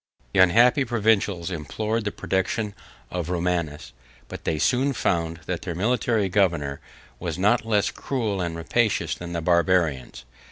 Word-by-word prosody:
The - - +2
unhappy 120 - +5
provincials 105 -7 +1
implored 105 +8 -2
the 105 - -1
protection 100 +3 -1 0.4
of 90 -2 -3
Romanus; 85 -7 -2 0.4
but - - -8
they 80 - 0
soon 130 - +2
found 85 -7 -1
that - - -3
their 90 -2 -5
military 110 +1 +1
governor 85 -8 +1 0.4
was 85 -2 -4
not 105 +5 +2
less 105 -2 +2
cruel 110 -8 -2
and 85 -2 -3
rapacious 105 +7 0
than 85 0 -7
the 85 - -2
Barbarians. 85 -7 +1
95 Hz, 145 wpm, -24 LUFS, 85-110 Hz, 0.4 s, unhappy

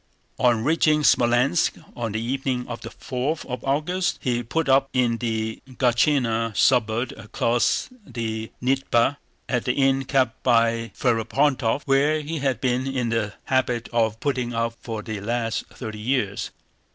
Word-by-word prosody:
On 120 -3 +3
reaching 150 +1 +3
Smolénsk 125 +7 +3 0.2
on 115 -3 -3
the 110 - -1
evening 125 +1 -2
of 120 -1 -6
the 115 - -7
fourth 130 +7 -3
of 125 -2 -5
August 155 +7 0
he 120 -4 0
put 145 +7 -2
up 135 0 +4
in 120 -3 +2
the 110 -1 -2
Gáchina 120 -3 +1
suburb 120 -1 +2
across 115 +2 0 0.2
the 110 - -4
Dnieper, 135 0 +2 0.3
at 125 -2 -1
the 125 - +1
inn 135 0 +2
kept 135 -1 +1
by 115 -2 +2
Ferapóntov, 125 +2 +1
where 145 +3 +3
he 155 +2 -4
had 135 -4 0
been 130 +1 0
in 130 -3 -1
the 110 -3 -1
habit 125 -3 0
of 110 -2 0
putting 125 -4 -1
up 115 0 0
for 110 -3 -5
the 110 -3 -5
last 115 +1 -2
thirty 110 -4 -8
years. 105 -4 -1
125 Hz, 150 wpm, -24 LUFS, 115-135 Hz, 0.3 s, up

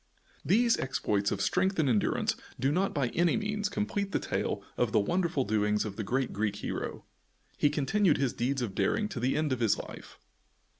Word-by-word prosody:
These 230 +5 +3
exploits 105 -6 0
of 100 - -1
strength 195 +1 +1
and 155 -3 +2
endurance 110 -5 +1 0.2
do 135 +3 +2
not 185 +5 +1
by 140 -5 0
any 170 +3 +2
means 210 -1 -1
complete 205 -1 -2
the - - +2
tale - - -2
of - - +1
the - - +5
wonderful 170 - +1
doings 105 0 +1
of 100 -2 -5
the 110 - -3
great 130 +5 -1
Greek 105 0 -1
hero. - - -5 0.5
He 145 - +3
continued 155 +5 +2
his 135 -2 0
deeds 130 +2 -1
of 105 -5 -3
daring 210 - +1
to 140 - -5
the 125 +3 +1
end 155 -3 +1
of 130 - -3
his 115 -3 +2
life. - - -9
135 Hz, 195 wpm, -30 LUFS, -, 0.5 s, the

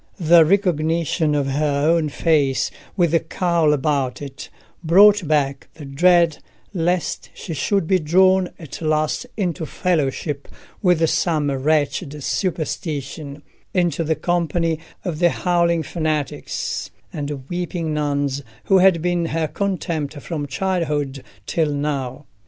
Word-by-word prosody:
The 170 -1 +6
recognition 165 -3 +1
of 145 -1 +1
her 140 +1 0
own 165 -2 +2
face, 145 -3 +1 0.3
with 170 -4 +3
the 165 - +4
cowl 165 -1 +1
about 140 -3 0
it, 140 -1 -8 0.3
brought 200 +2 +6
back 140 -3 0
the 150 - -9
dread 170 +3 +3 0.3
lest 175 -1 -1
she 170 - -6
should 170 +6 0
be 185 +2 +2
drawn 185 +3 +3
at 160 -2 -9
last 155 +8 0
into 180 -5 -1
fellowship 150 -4 -1 0.3
with 175 -5 +3
some 155 -4 +1
wretched 145 +1 0
superstition—into 155 0 -3
the 160 0 0
company 165 0 0 0.3
of 165 -4 -3
the 175 -1 +5
howling 170 -2 +1
fanatics 155 -3 -3 0.2
and 145 -3 -5
weeping 175 -2 -3
nuns 145 -2 -1 0.2
who 195 -1 +4
had 180 -3 +4
been 175 -1 +1
her 160 0 -1
contempt 165 -5 -3
from 145 -1 -4
childhood 150 -4 -2 0.2
till 160 -3 0
now. 140 -2 -3
160 Hz, 125 wpm, -21 LUFS, 145-175 Hz, 0.3 s, The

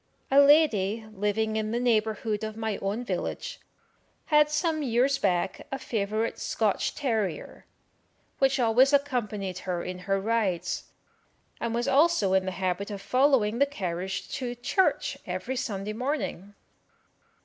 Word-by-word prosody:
"A 275 - +7
lady,[Q] 225 -8 +3
living 215 +2 0
in 215 0 -1
the 235 +2 -1
neighbourhood 220 -2 0
of 215 0 -5
my 220 -2 -2
own 205 +5 -2
village, - - -4 0.7
had 300 -1 +4
some 310 +1 0
years 265 +1 +2
back 185 -4 -1
a 270 - -2
favourite 215 -1 -2
Scotch - - 0
terrier, 220 - -2 0.7
which 270 0 +3
always 250 +4 +4
accompanied 215 -10 0
her 180 -2 -3
in 180 0 -5
her 195 0 +2
rides, 205 -4 -1 0.7
and 235 0 -2
was 240 0 -1
also 280 - +3
in 190 0 +3
the 185 - -2
habit 185 +2 -2
of 205 -1 -5
following 250 0 +2
the 280 - +4
carriage 185 -7 -4
to 245 -2 -4
church 305 +10 0
every 260 - -3
Sunday 215 -5 -3
morning. 225 - -3
220 Hz, 140 wpm, -27 LUFS, 195-265 Hz, 0.7 s, A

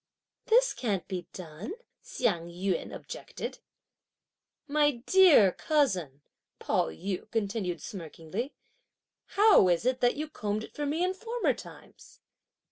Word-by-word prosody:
"This - - +4
can't 200 -7 -2
be 180 -3 -5
done!" 180 - -7 0.3
Hsiang 175 -9 -1
yün 180 +1 -2
objected. - - -7 1.1
"My 290 -4 +1
dear 350 - +7
cousin," 180 - 0 0.3
Pao - - 0
yü 180 - -5
continued 200 -6 -2
smirkingly, 185 - -6 0.8
"how 415 - +7
is 175 +5 +1
it 255 0 +1
that 245 0 +3
you 305 +2 -3
combed 215 -6 -3
it - - -11
for 295 -1 -3
me 315 +5 0
in 370 +1 +1
former 460 +5 -1
times?" - - -14
220 Hz, 125 wpm, -29 LUFS, 180-295 Hz, 1.1 s, dear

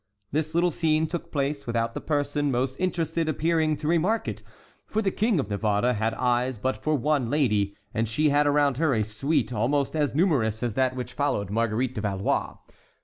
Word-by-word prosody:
This 155 +2 -1
little 175 +1 +3
scene 160 0 +1
took 170 +1 -5
place 140 -1 -2
without 115 -1 -1
the - - -5
person 145 -1 0
most 130 +1 0
interested 165 -3 -1
appearing 160 0 +1
to 150 - -4
remark 175 +7 +1
it, - - -4 0.5
for 215 - -1
the 200 -3 +1
King 215 -3 +1
of 130 - -1
Navarre 105 +4 +1
had 110 0 -1
eyes 125 0 0
but 130 +5 -1
for 155 0 -1
one 140 -3 +1
lady, 105 -8 +1 0.2
and 115 0 -1
she 150 +7 +2
had 145 +1 +3
around 145 -2 +2
her 155 -4 +2
a 110 - +1
suite 125 +7 -1
almost 135 +7 0
as 145 -3 0
numerous 125 - +1
as 120 -3 -1
that 130 +1 +1
which 125 -1 -5
followed 105 -9 -1
Marguerite 115 +3 0
de 110 - -4
Valois. 100 -2 -1
140 Hz, 195 wpm, -26 LUFS, 115-155 Hz, 0.5 s, little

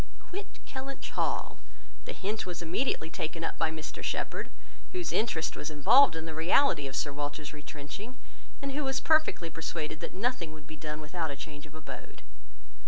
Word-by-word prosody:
"Quit 395 +3 -7
Kellynch 270 +1 -5
Hall." - - 0 0.5
The - - -3
hint 210 +3 -1
was 175 -1 -3
immediately 165 -1 +1
taken 165 +1 -2
up - - -2
by 165 - +4
Mr 155 0 -5
Shepherd, - - -1 0.4
whose 360 -2 -1
interest 190 -8 +1
was 150 - -2
involved 160 - +7
in 160 0 -3
the 160 - -4
reality 165 - +5
of 135 - -5
Sir 145 - +1
Walter's 145 +1 -3
retrenching, 150 - -7 0.5
and 275 - 0
who 295 +2 0
was 265 -1 +1
perfectly 310 - +4
persuaded 160 -1 -3
that - - -5
nothing 190 -7 0
would 155 -2 -11
be 155 - -8
done 150 +1 -4
without 160 +1 -2
a 140 - -3
change 145 +1 -7
of 155 - -15
abode. 155 - -8
160 Hz, 175 wpm, -31 LUFS, 150-230 Hz, 0.5 s, involved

